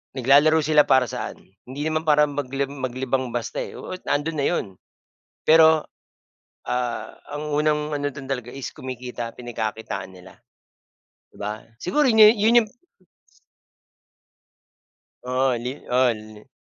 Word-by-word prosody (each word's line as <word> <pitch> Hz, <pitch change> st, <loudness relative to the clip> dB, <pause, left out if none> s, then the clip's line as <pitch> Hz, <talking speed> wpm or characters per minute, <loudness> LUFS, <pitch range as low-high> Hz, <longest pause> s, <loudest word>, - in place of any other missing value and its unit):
Naglalaro 145 Hz, +5 st, +5 dB
sila, 150 Hz, 0 st, +5 dB
para 130 Hz, -2 st, +4 dB
saan? -, -, -6 dB, 0.3 s
Hindi 135 Hz, +3 st, -7 dB
naman 155 Hz, 0 st, -1 dB
para 150 Hz, 0 st, +5 dB
magli 140 Hz, -1 st, -3 dB
maglibang 130 Hz, -1 st, -3 dB
basta, 120 Hz, -, -3 dB
eh, -, -, -9 dB
oo -, -, -6 dB
nandun 145 Hz, +3 st, 0 dB
na -, -, 0 dB
yun. 175 Hz, -, 0 dB, 0.8 s
Pero 160 Hz, -1 st, +6 dB, 0.8 s
ah, 120 Hz, -3 st, -3 dB
ang 150 Hz, +1 st, -5 dB
unang 150 Hz, 0 st, +1 dB
ano 145 Hz, 0 st, -1 dB
dun 140 Hz, -1 st, -9 dB
talaga 125 Hz, -3 st, -3 dB
is 135 Hz, -1 st, -5 dB
kumikita, 125 Hz, -2 st, -6 dB
pinagkakitaan 110 Hz, -5 st, -5 dB
nila, 90 Hz, 0 st, -15 dB, 0.9 s
di -, -, -20 dB
ba? 105 Hz, +1 st, -5 dB, 0.2 s
Siguro, 290 Hz, +12 st, +1 dB
yu 220 Hz, -2 st, +8 dB
yun 225 Hz, +3 st, +5 dB
yung 215 Hz, -, -12 dB, 2.6 s
Oo, 130 Hz, +1 st, +1 dB
li 125 Hz, -, -2 dB, 0.2 s
oo, 125 Hz, 0 st, +4 dB
li. 110 Hz, +1 st, -13 dB
135 Hz, 130 wpm, -23 LUFS, 125-150 Hz, 2.6 s, yu